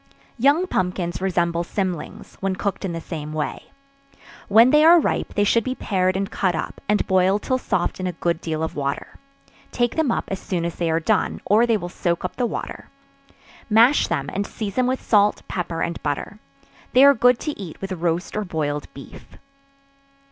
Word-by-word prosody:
Young 285 +8 +4
pumpkins 180 - -2
resemble 170 -2 0
cymlings, 180 -2 -4
when 195 -1 -1
cooked 200 +1 -3
in 190 - -2
the 165 - -4
same 155 -2 -6
way. 155 -1 -4 0.8
When 225 +5 +6
they 300 0 +5
are 335 +2 +8
ripe, - - -2
they 205 - +3
should 230 +3 +3
be 255 +3 -3
pared 185 -4 0
and 195 0 -3
cut 185 -3 0
up, - - -5
and 210 - +2
boiled 190 +2 +2
till 255 0 0
soft 185 -7 -1
in 185 - -2
a - - -1
good 170 0 -1
deal 160 -1 -3
of 160 - -4
water; 140 -1 -4 0.5
take 240 -1 0
them 315 -6 +2
up - - -1
as 195 - -3
soon 175 -4 -3
as 170 - -2
they 170 0 -2
are 160 0 +2
done, 195 +5 0
or 220 +5 +4
they 230 -2 +3
will 175 -3 -6
soak 175 0 -2
up 180 - -4
the 245 - +1
water; - - -6 0.8
mash 230 +6 +5
them 140 0 -2
and 200 +1 -2
season 210 -4 -5
them 255 -1 +2
with 260 +1 -2
salt, 205 -1 +3
pepper 170 -2 -3
and 170 - -4
butter. 150 +8 -4 0.5
They 260 +3 +7
are 280 - +8
good 245 0 +4
to 300 -6 -4
eat 180 -6 -8
with 195 0 -6
roast 170 0 -2
or 215 - -1
boiled 150 -5 -3
beef. 135 - -13
190 Hz, 200 wpm, -22 LUFS, 170-225 Hz, 0.8 s, are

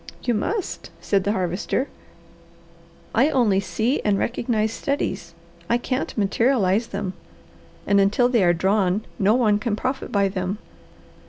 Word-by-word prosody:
"You 240 - +1
must," 380 - -3
said 195 -2 0
the 205 - +2
Harvester. 185 +8 -1 1.3
"I 265 +7 +4
only 230 -9 +3
see 230 +6 -1
and 205 -2 +2
recognize 225 -1 -1
studies; 190 -12 -3 0.3
I 235 - +3
can't 255 +1 -3
materialize 215 0 +2
them, 200 -2 -4 0.7
and 200 0 +4
until 210 +5 +3
they 240 -5 +2
are 175 - +5
drawn, 190 +3 +1
no 205 +2 +4
one 215 -5 +3
can 215 -1 -1
profit 260 +5 -3
by 200 -1 +2
them. 190 +1 -3
210 Hz, 140 wpm, -23 LUFS, 195-240 Hz, 1.3 s, are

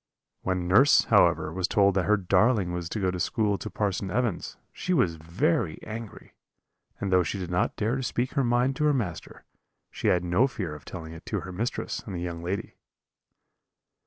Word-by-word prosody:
When 90 -2 -1
nurse, 130 +11 +6
however, 80 - +4
was 95 0 0
told 100 0 +3
that 95 -1 +1
her 105 0 +4
darling 100 +1 +2
was 85 -1 -4
to 110 - -3
go 95 -2 +1
to 90 - -5
school 105 +2 0
to 110 - -5
Parson 100 -2 -2
Evans, 120 -2 -2 0.2
she 180 - -1
was 90 - +2
very 80 0 0
angry; 110 -2 -8 0.7
and 100 - -2
though 90 - +6
she 90 +3 -2
did 90 -2 -5
not 90 - 0
dare 115 +5 0
to - - -3
speak 125 0 -1
her 140 - +1
mind 125 +2 +2
to 150 - +1
her 150 -1 +3
master, 90 - -4 0.5
she - - -3
had 90 -1 +3
no 90 +9 +3
fear 95 - -5
of 75 - -11
telling 80 -3 -8
it 80 - -11
to - - -2
her 95 - -7
mistress 110 +7 -3
and 100 - -7
the - - -3
young 85 -1 -4
lady. 95 +5 -4
95 Hz, 200 wpm, -27 LUFS, 90-115 Hz, 0.7 s, nurse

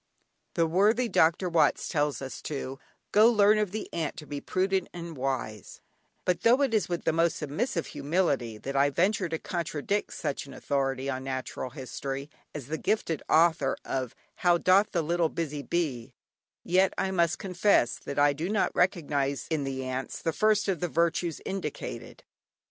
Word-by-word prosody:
The 165 - +3
worthy 210 +9 +3
Dr. 170 -2 +3
Watts 165 -2 +2
tells 145 -2 0
us 135 - -7
to 135 -2 -5 0.3
"go 215 +2 +7
learn 210 -2 +5
of 210 -2 +1
the 215 +3 -5
ant 160 -3 -2
to 150 - -8
be 145 0 -5
prudent 190 0 0
and 170 -2 -7
wise," 130 -6 -4 0.5
but 180 -1 +1
though 245 +7 +5
it 265 -4 0
is 215 -4 +1
with 175 -1 -2
the - - +1
most 165 0 +2
submissive 165 - -2
humility 140 -8 -1
that 135 +5 -6
I 140 +1 +4
venture 185 +4 +1
to 160 - -1
contradict 170 +4 -2
such 145 -3 -3
an 135 - -10
authority 135 -1 -1
on 130 -1 -3
natural 130 -1 -4
history 135 +1 -6 0.2
as 145 -4 -5
the 160 +4 -4
gifted 170 -7 0
author 160 -4 +3
of 130 -3 -3 0.2
"How 175 -1 +4
doth 190 +4 +4
the 170 -3 0
little 170 +1 +1
busy 150 -3 -3
bee," 140 -8 -2 0.5
yet 185 +2 +3
I 190 - 0
must 170 -3 +2
confess 180 - +2
that 140 - -7
I 145 0 +5
do 160 +6 -3
not 210 -1 +1
recognise 145 -6 +1
in 150 -3 0
the 135 -1 -3
ants 130 +1 -4
the 165 - -1
first 215 +4 +2
of 190 -4 0
the 175 - -1
virtues 170 0 0
indicated. 190 -6 -5
165 Hz, 175 wpm, -28 LUFS, 140-185 Hz, 0.5 s, go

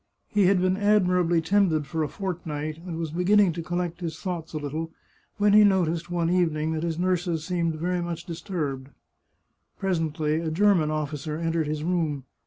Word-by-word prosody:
He 205 -3 +3
had 195 -1 +4
been 185 +1 +1
admirably 180 -5 +3
tended 165 -4 +2
for 160 +3 -3
a 155 - +1
fortnight, 155 -3 -4
and 165 -2 -4
was 165 -2 -3
beginning 180 +2 +3
to 170 - -4
collect 175 0 -3
his 165 -2 -4
thoughts 175 -4 -4
a 155 - -4
little, 155 +2 -4 0.5
when 205 0 +3
he 210 0 +8
noticed, 175 -4 +2
one 170 -1 0
evening, 160 -3 +1
that 160 -1 -2
his 165 -1 -2
nurses 175 -2 0
seemed 170 -2 -1
very 175 +3 -1
much 170 -1 -4
disturbed. 160 -6 -4 0.9
Presently 160 -4 0
a 165 -1 -2
German 175 -2 +3
officer 150 0 -3
entered 165 -1 -1
his 150 0 -3
room. 160 -5 -1
170 Hz, 175 wpm, -26 LUFS, 155-180 Hz, 0.9 s, he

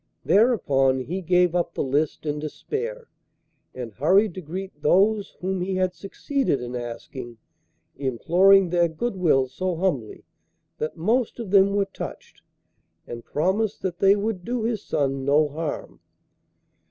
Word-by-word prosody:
Thereupon 145 - +3
he 180 +9 -4
gave 180 0 +3
up 175 -1 -1
the - - -1
list 145 +3 -1
in 150 0 -2
despair 450 - -5 0.7
and 120 -4 -6
hurried 185 - +3
to 185 - -7
greet 180 0 -7
those 200 +6 +2
whom 190 0 -2
he 190 +1 -2
had 185 -1 0
succeeded 195 - -2
in 125 0 -6
asking, 120 0 -7 0.6
imploring 175 +8 +3
their 175 -1 +3
goodwill 165 - +1
so 180 +7 -3
humbly 160 - -2 0.6
that 155 +3 -3
most 225 +8 0
of 220 -5 -6
them 200 0 +5
were 200 -1 +2
touched, 195 - -9 0.6
and 120 0 -8
promised 195 +7 -1
that 180 -2 -3
they 195 +1 +5
would 205 -3 -2
do 240 +2 -2
his 225 -3 -2
son 135 -2 -1
no 145 +3 +3
harm. 155 +1 -5
180 Hz, 140 wpm, -24 LUFS, 145-195 Hz, 0.7 s, them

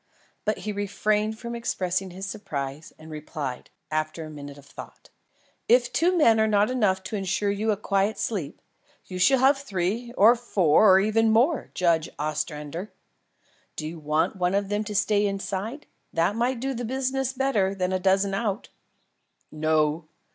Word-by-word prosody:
But 215 0 0
he 210 - -4
refrained 210 +2 0
from 235 0 -6
expressing 190 -5 -2
his 185 +2 -7
surprise 155 -8 -5
and 160 0 -12
replied, 150 -4 -6 0.2
after 155 +1 -2
a 155 - -9
minute 145 -1 -9
of 140 - -15
thought: - - -12 0.6
"If 245 +1 +4
two 360 +2 +2
men 230 -9 +5
are 220 - +3
not 210 +2 +3
enough 200 -7 +1
to 220 - -5
ensure 195 +1 0
you 210 +2 -1
a 210 - +2
quiet 200 +1 0
sleep, 175 -10 -4 0.4
you 185 -1 -6
shall 265 +9 +5
have 270 +2 +4
three 220 0 -2
or 220 +4 +7
four 200 -5 +4
or - - +6
even 220 +3 +2
more, 245 +7 +2
Judge 165 -3 +2
Ostrander. 150 +4 -4 0.8
Do 155 - -4
you 165 +1 -7
want 155 +6 0
one 180 +1 +1
of 200 -1 0
them 205 +1 0
to 210 -1 -5
stay 205 0 +2
inside? 200 +7 -4 0.3
That 170 +5 +1
might 240 +2 0
do 270 +2 -2
the 245 -1 -4
business 265 +2 -1
better 225 -8 +1
than 185 -1 -1
a 185 - +1
dozen 195 +1 +2
out." 205 +1 -2 0.8
"No. 155 0 +1
200 Hz, 170 wpm, -25 LUFS, 170-225 Hz, 0.8 s, or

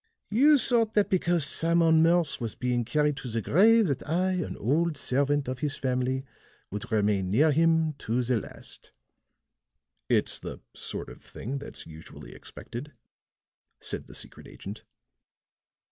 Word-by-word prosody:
"You 285 +7 +6
thought 230 -4 +2
that 210 -1 +2
because 175 -4 +2
Simon 165 +1 +3
Morse 165 -3 +2
was 115 -2 -4
being 125 -1 -1
carried 150 +4 +1
to 135 - -6
the 115 -1 -2
grave 220 - +4
that 140 -6 -1
I, 180 +4 +1
an 180 -2 -3
old 155 +7 0
servant 140 +1 0
of 130 0 -4
his 145 -1 -1
family, 130 +1 -1 0.5
would 105 +3 -6
remain 105 -3 +1
near 145 +11 +4
him 160 +1 +2
to 120 +3 -1
the 125 0 +1
last." - - -8 1.2
"It's - - +1
the - - -7
sort - - -4
of - - -13
thing 135 +5 -6
that's 140 - -9
usually 75 -5 -12
expected," 140 +6 -9 0.9
said - - 0
the - - -8
secret - - -7
agent. - - -10
145 Hz, 145 wpm, -27 LUFS, 125-170 Hz, 1.2 s, You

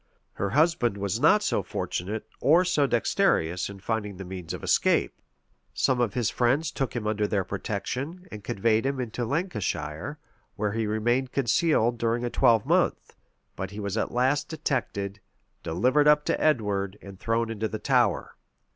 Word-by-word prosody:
Her 100 - -2
husband 135 - +2
was 100 +2 -2
not 205 +9 +5
so - - +1
fortunate 105 +5 -4
or 170 +6 +4
so 150 -6 +2
dexterous 90 -7 +1
in 100 -1 -9
finding 105 -1 -3
the 95 - -7
means 90 -2 -7
of - - -6
escape. - - +2 0.6
Some 125 -2 +2
of 115 -4 0
his 120 -4 +1
friends 135 +6 +1
took 135 -5 -3
him 115 -3 -3
under 105 -1 0
their 100 -3 0
protection, 125 - -4
and 105 -1 -8
conveyed 110 +4 +1
him 135 0 -1
into 120 0 -3
Lancashire, 140 - -3 0.4
where 105 0 -1
he 110 0 -1
remained 120 +5 0
concealed 120 -2 +2
during 115 +1 0
a 120 - -3
twelvemonth; 115 -5 +2 0.4
but 95 - -4
he 100 +2 -8
was 100 -1 -3
at 115 - -1
last 130 +4 +1
detected, 105 -10 -2 0.4
delivered 125 - +2
up 150 0 +5
to - - 0
Edward, 105 -9 +1
and 100 -1 -11
thrown 115 +1 0
into 110 0 -2
the 110 - -4
Tower. - - +1
115 Hz, 165 wpm, -26 LUFS, 100-135 Hz, 0.6 s, not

